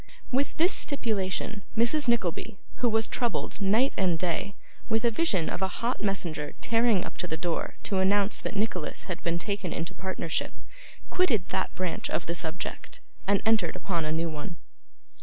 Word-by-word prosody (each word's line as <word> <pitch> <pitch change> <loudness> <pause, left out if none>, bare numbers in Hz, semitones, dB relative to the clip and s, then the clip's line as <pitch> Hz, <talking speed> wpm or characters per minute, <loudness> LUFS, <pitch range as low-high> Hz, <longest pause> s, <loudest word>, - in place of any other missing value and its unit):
With 270 +3 +1
this 345 +4 +5
stipulation, 210 -6 0 0.2
Mrs. 245 +5 +3
Nickleby, 200 -5 +1 0.2
who 245 - +2
was 220 0 +3
troubled, 240 -4 -1
night 220 +8 +4
and 180 -4 +3
day, 185 +4 -1 0.3
with 225 +1 +2
a 235 - +4
vision 215 - +2
of - - -3
a 190 - +3
hot 235 +6 -2
messenger 170 -7 -1
tearing 230 -4 +3
up - - -8
to 180 - -2
the 160 - -2
door 175 -1 -2
to 195 - +1
announce 200 +2 +3
that - - -4
Nicholas 195 -6 -1
had 175 -3 -5
been 170 0 0
taken 200 -1 -2
into 165 0 -3
partnership, 185 -4 -2 0.6
quitted 235 - +2
that - - -1
branch 185 -2 -2
of 165 - -1
the 170 - -1
subject, 170 0 -4 0.3
and 200 0 +3
entered 215 -7 +3
upon 170 -4 -1
a 155 - -1
new 165 +1 +1
one. 160 +3 -5
195 Hz, 175 wpm, -28 LUFS, 170-225 Hz, 0.6 s, this